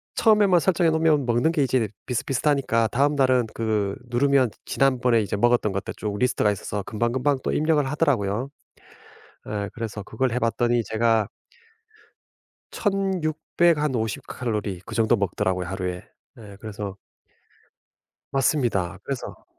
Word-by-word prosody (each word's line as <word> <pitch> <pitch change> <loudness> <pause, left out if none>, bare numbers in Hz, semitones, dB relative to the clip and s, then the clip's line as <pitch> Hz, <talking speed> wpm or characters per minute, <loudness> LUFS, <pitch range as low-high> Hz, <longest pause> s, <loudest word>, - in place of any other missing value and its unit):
처음에만 205 -5 +4
설정해 175 -1 +2
놓으면 160 -3 +2
먹는 120 +6 +2
게 155 -4 +1
이제 125 -4 +1 0.2
비슷비슷하니까 125 -2 +1
다음날은 130 -1 +2
그 105 -3 -1
누르면 130 0 +3 0.2
지난번에 125 -4 +2
이제 100 - -2
먹었던 120 -1 +2
것들 95 0 -4
쭉 105 -1 -3
리스트가 115 -4 +2
있어서 100 +1 -4
금방금방 125 +7 0
또 - - -1
입력을 155 -1 +2
하더라고요. 130 -6 0 1.0
어 105 -1 -3
그래서 110 -3 -5
그걸 125 +4 -1
해 125 - 0
봤더니 120 +1 +1
제가 110 -1 +2 1.4
1,600 175 -4 +1
한 150 -3 0
50 110 -2 -2
칼로리 105 -7 -3
그 115 - -7
정도 115 0 +3
먹더라고요 95 -2 -1
하루에. 90 -1 -4 0.3
네 105 -3 -12
그래서 100 -2 -6 1.3
맞습니다. 120 - 0
그래서 135 -3 -6
120 Hz, 305 characters per minute, -24 LUFS, 105-140 Hz, 1.4 s, 처음에만